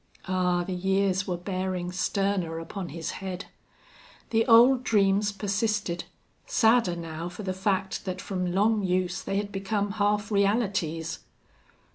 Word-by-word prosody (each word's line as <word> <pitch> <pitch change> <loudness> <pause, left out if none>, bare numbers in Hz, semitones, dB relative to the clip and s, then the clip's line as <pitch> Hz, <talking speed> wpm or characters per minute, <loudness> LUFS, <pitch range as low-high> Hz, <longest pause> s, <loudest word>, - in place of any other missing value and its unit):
Ah! 180 -1 +1
the 185 - -4
years 190 +1 +1
were 180 -2 -1
bearing 185 -1 -3
sterner 185 -2 -1
upon 175 +2 -6
his 165 +2 -4
head! 190 -1 -5 0.9
The 225 +1 +2
old 245 +2 +7
dreams 205 -2 +3
persisted, 200 -3 -1 0.4
sadder 225 -5 +3
now 165 0 -5
for 195 +4 -8
the 185 -1 -2
fact 190 0 -1
that 185 -1 -3
from 180 -2 -2
long 210 +3 +2
use 185 0 0
they 195 - -2
had 205 0 -2
become 200 +1 -1
half 205 +1 +1
realities! 195 -6 0
190 Hz, 135 wpm, -27 LUFS, 180-205 Hz, 0.9 s, old